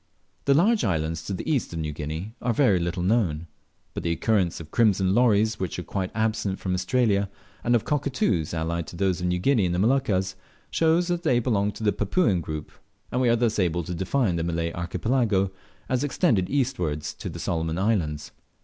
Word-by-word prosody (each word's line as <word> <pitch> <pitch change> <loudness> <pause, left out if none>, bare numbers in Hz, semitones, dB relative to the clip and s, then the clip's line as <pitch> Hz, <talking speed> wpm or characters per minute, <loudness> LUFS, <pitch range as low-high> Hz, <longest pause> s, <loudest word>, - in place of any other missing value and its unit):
The 140 - +4
large 210 +8 +3
islands 80 -3 -1
to 100 - -3
the - - -6
east 145 - 0
of - - -4
New 75 -2 -2
Guinea 80 +8 -5
are 120 -2 0
very 110 -10 +4
little 85 +1 -2
known, 90 -6 +1 0.5
but - - -4
the 85 - -1
occurrence 95 0 +1
of 80 -2 -10
crimson 100 -5 +3
lories, 110 -2 +3
which 95 -4 -3
are - - -4
quite 95 -2 -3
absent 110 -3 0
from 95 - -3
Australia, 100 +1 +1 0.3
and 120 0 +3
of 115 - +1
cockatoos 125 - 0
allied 85 0 -2
to - - -9
those 95 0 0
of 90 - 0
New 90 0 +1
Guinea 105 0 +2
and 85 - -1
the - - 0
Moluccas, 100 -5 +1 0.4
shows 165 +2 +2
that 175 -1 0
they 140 -8 +2
belong 105 -4 +1
to - - -8
the 105 - +3
Papuan 105 - +1
group; 75 -2 -6 0.4
and 125 - 0
we 125 - +3
are 115 - +5
thus 115 -2 +1
able 85 -2 +1
to 90 - -5
define 95 +2 0
the 80 - -1
Malay 85 0 -1
Archipelago 100 +2 0 0.4
as 130 +1 0
extending 135 - +2
eastward 120 - -1
to - - -5
the - - -7
Solomon's 80 -1 -2
Islands. 80 -7 0
100 Hz, 200 wpm, -25 LUFS, 85-120 Hz, 0.5 s, are